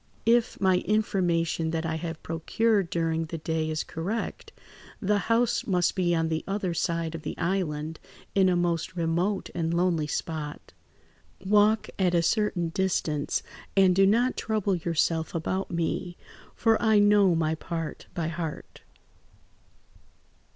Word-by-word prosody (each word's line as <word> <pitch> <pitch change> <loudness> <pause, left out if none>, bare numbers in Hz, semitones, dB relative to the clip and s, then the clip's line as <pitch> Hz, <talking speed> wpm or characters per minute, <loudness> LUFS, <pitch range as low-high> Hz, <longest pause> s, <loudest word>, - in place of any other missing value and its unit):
"If 235 0 +2
my 185 -2 +3
information 175 -6 0
that 160 0 -2
I 160 0 -1
have 165 0 -6
procured 195 +4 0
during 165 -1 0
the 165 +1 -5
day 160 0 -2
is 155 0 -1
correct, 195 +8 -4 0.5
the 205 +1 +1
house 235 +1 +2
must 180 -3 +2
be 175 -2 +1
on 165 0 +1
the 160 0 -1
other 195 -3 -1
side 165 -1 -1
of 165 - -6
the - - -5
island, 160 -4 -2 0.3
in 190 -1 +4
a 180 - +2
most 175 +1 -1
remote 175 +4 -1
and 165 -1 -1
lonely 170 -3 +1
spot. 150 -2 -5 0.7
Walk 210 +2 +4
at 180 -2 +2
a 170 - +3
certain 185 -3 +1
distance, 160 -5 -1 0.3
and 190 -2 +5
do 195 +1 +5
not 240 +5 +3
trouble 215 -3 0
yourself 165 -1 0
about 185 +4 -2
me, 175 +1 -2 0.4
for 225 -1 +2
I 220 -2 +4
know 205 -3 +5
my 160 -1 +1
part 165 0 -5
by 165 -3 -1
heart." 165 -1 -6
175 Hz, 145 wpm, -27 LUFS, 165-195 Hz, 0.7 s, and